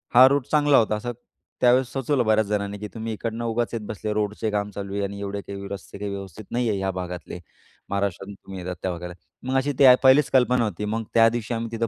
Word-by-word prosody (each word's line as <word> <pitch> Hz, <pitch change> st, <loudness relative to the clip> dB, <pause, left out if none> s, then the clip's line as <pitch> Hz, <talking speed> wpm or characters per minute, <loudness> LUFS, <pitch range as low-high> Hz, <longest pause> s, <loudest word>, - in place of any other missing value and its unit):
हा 130 Hz, +1 st, +10 dB
रूट 140 Hz, -1 st, +1 dB
चांगला 145 Hz, -2 st, +5 dB
होता 110 Hz, -2 st, +3 dB
असं 120 Hz, +3 st, -4 dB, 0.5 s
त्यावेळेस 125 Hz, +1 st, +4 dB
सुचवलं 135 Hz, -1 st, 0 dB
बऱ्याच 110 Hz, 0 st, +3 dB
जणांनी 100 Hz, -1 st, -2 dB
की 105 Hz, -, -5 dB
"तुम्ही 115 Hz, 0 st, -4 dB
इकडनं 115 Hz, +2 st, -4 dB
उगाच 115 Hz, +1 st, 0 dB
येत 115 Hz, -, -2 dB
बसले, 110 Hz, 0 st, -3 dB
रोडचे 105 Hz, +1 st, -1 dB
काम 105 Hz, 0 st, -1 dB
चालू 100 Hz, 0 st, -6 dB
आहे 100 Hz, 0 st, -1 dB
आणि 100 Hz, 0 st, -4 dB
एवढे 100 Hz, 0 st, -4 dB
काही 100 Hz, 0 st, -7 dB
रस्ते 100 Hz, 0 st, -8 dB
काही 100 Hz, 0 st, -4 dB
व्यवस्थित 100 Hz, +1 st, -8 dB
नाही 120 Hz, -1 st, 0 dB
आहे, 105 Hz, -, 0 dB
या 95 Hz, 0 st, -1 dB
भागातले, 90 Hz, -1 st, -6 dB, 0.5 s
महाराष्ट्रातून 100 Hz, 0 st, -2 dB
तुम्ही 95 Hz, -1 st, -10 dB
येतात 90 Hz, +1 st, -5 dB
वगैरे 85 Hz, -, -15 dB
त्या 95 Hz, -, 0 dB
भागाला." 90 Hz, 0 st, -6 dB, 0.4 s
मग 135 Hz, -, +2 dB
अशी 135 Hz, +2 st, +1 dB
ती 140 Hz, -, +7 dB, 0.2 s
पहिलीच 135 Hz, +2 st, +6 dB
कल्पना 125 Hz, -2 st, +4 dB
होती. 105 Hz, -2 st, -3 dB
मग 110 Hz, +2 st, -2 dB
त्यादिवशी 115 Hz, 0 st, +3 dB
आम्ही 115 Hz, 0 st, -3 dB
तिथं 115 Hz, 0 st, -1 dB
105 Hz, 225 wpm, -24 LUFS, 100-120 Hz, 0.5 s, हा